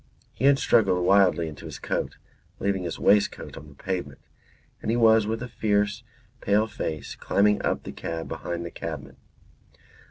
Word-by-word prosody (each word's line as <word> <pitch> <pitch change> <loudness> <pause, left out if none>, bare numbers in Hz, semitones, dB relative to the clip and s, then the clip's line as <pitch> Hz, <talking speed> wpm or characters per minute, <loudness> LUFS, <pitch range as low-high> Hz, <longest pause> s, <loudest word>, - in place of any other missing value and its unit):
He 130 - -2
had 140 0 +6
struggled 95 -9 +3
wildly 95 -4 +4
into 75 -2 -9
his - - -7
coat - - -3 0.4
(leaving 100 -1 -1
his 85 -3 -4
waistcoat 105 0 +2
on 75 - -10
the 70 - -17
pavement), 85 -4 -4 0.6
and - - -3
he 115 - +2
was 110 -2 +5
with 115 +2 -2
a - - -5
fierce 105 -1 0 0.4
pale 105 +2 +3
face 80 -8 -5
climbing 105 +1 +2
up - - 0
the - - -7
cab 80 0 -5
behind 85 0 -4
the 85 - -6
cabman. - - -7
100 Hz, 165 wpm, -26 LUFS, 85-110 Hz, 0.6 s, had